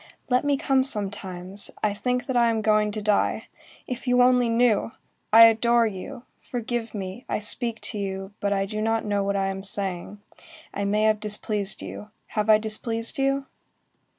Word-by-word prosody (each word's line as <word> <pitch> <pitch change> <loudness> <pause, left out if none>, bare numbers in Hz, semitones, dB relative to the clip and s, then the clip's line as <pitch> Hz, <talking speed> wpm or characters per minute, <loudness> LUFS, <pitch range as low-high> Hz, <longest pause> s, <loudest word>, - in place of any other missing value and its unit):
Let 250 0 +2
me 285 -1 +1
come 270 -3 +1
sometimes; 195 -4 -1
I 210 -1 +1
think 250 +4 -2
that 260 - -3
I 235 -1 +4
am 225 -1 -1
going 215 -1 +2
to 215 -1 -5
die. 210 -1 0 0.4
If 255 +1 -7
you 250 0 +3
only 250 -1 +3
knew! 230 -2 +1 0.4
I 225 +1 +9
adore 235 +1 +3
you. 215 +3 -6 0.2
Forgive 240 -2 -5
me, 195 +4 -6
I - - 0
speak 225 +2 +4
to 210 - -5
you, 195 0 -5
but 200 - -1
I 195 -1 0
do 215 +2 -5
not 225 0 0
know 205 -1 0
what 200 0 -1
I 195 -1 0
am 195 0 -5
saying; 195 0 -5 0.5
I 200 - -3
may 210 +2 +1
have 215 -1 +2
displeased 210 -1 0
you; 210 - -9 0.2
have 210 0 -2
I 215 - +7
displeased 225 +2 -1
you?" 275 0 0
215 Hz, 180 wpm, -24 LUFS, 200-240 Hz, 0.5 s, I